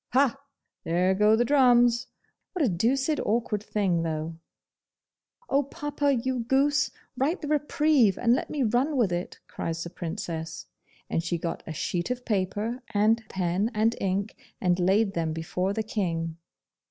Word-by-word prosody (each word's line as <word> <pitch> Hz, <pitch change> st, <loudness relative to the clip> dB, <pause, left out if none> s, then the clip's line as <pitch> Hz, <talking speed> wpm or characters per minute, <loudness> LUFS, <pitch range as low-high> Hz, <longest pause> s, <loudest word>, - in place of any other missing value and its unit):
'Ha! 265 Hz, -1 st, +4 dB, 0.5 s
there 180 Hz, +3 st, +2 dB
go 210 Hz, +3 st, +4 dB
the 240 Hz, +2 st, +2 dB
drums! 245 Hz, -3 st, +4 dB, 0.5 s
What 350 Hz, -6 st, +1 dB
a -, -, +2 dB
doosid 265 Hz, -, +1 dB
awkward 215 Hz, -1 st, 0 dB
thing 195 Hz, -5 st, 0 dB
though!' 160 Hz, 0 st, -3 dB, 1.1 s
'Oh, 280 Hz, -, +3 dB
papa, 290 Hz, 0 st, -1 dB
you 255 Hz, 0 st, 0 dB
goose! 275 Hz, +5 st, +2 dB, 0.3 s
Write 285 Hz, +8 st, 0 dB
the -, -, -3 dB
reprieve, 295 Hz, -6 st, +3 dB
and 235 Hz, 0 st, +3 dB
let -, -, -1 dB
me 290 Hz, -3 st, -1 dB
run 250 Hz, +6 st, +1 dB
with 220 Hz, -7 st, +2 dB
it,' 175 Hz, +1 st, -3 dB
cries 165 Hz, 0 st, -4 dB
the 170 Hz, -, -7 dB
Princess 165 Hz, -2 st, -5 dB, 0.4 s
and -, -, 0 dB
she 170 Hz, +1 st, -2 dB
got 165 Hz, 0 st, -4 dB
a 160 Hz, -, -4 dB
sheet 175 Hz, +5 st, -2 dB
of 250 Hz, 0 st, -3 dB
paper, 210 Hz, +4 st, -1 dB
and 220 Hz, +3 st, +3 dB
pen 185 Hz, +3 st, 0 dB
and 225 Hz, +2 st, +2 dB
ink, 195 Hz, +2 st, -1 dB, 0.2 s
and 180 Hz, 0 st, +1 dB
laid 195 Hz, +3 st, +3 dB
them 165 Hz, -2 st, -1 dB
before 180 Hz, +4 st, -2 dB
the 220 Hz, +2 st, -1 dB
King. 165 Hz, -7 st, -2 dB
215 Hz, 155 wpm, -27 LUFS, 175-255 Hz, 1.1 s, Ha